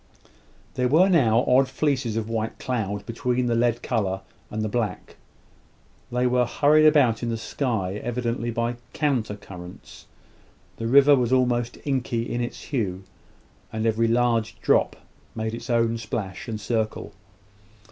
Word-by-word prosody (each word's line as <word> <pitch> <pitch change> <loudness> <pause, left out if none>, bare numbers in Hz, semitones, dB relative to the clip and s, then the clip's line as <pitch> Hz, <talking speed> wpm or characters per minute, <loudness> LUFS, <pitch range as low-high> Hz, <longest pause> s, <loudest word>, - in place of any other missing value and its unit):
There 125 -1 +1
were 165 +9 +5
now 120 - +4
odd 130 +1 +4
fleeces 135 -6 -1
of 110 -1 -2
white 115 -1 -3
cloud 105 -5 -3
between 125 +2 -1
the 120 - +1
lead 120 0 +1
colour 95 -5 -1 0.3
and 110 0 -3
the - - 0
black. 110 0 -3 1.0
They 125 +1 +1
were 125 -1 +2
hurried 155 +3 +4
about 135 -7 +4
in 120 - -2
the 115 - -1
sky, 110 -4 -2
evidently 120 -1 -2
by 115 +1 -2 0.2
counter 130 -9 0
currents. 90 -3 -12 0.7
The 115 - -3
river 140 +3 +7
was 125 -2 0
almost 120 -2 +1
inky 130 -4 -1
in 120 - -2
its 120 - -5
hue, 100 -9 -2 0.7
and 110 0 -2
every 115 +1 +2
large 115 -1 +1
drop - - +2 0.4
made 110 0 -3
its 120 +3 -7
own 115 -1 +1
splash 105 -2 -5
and 110 -2 -4
circle. 110 0 -2
115 Hz, 145 wpm, -24 LUFS, 110-125 Hz, 1.0 s, river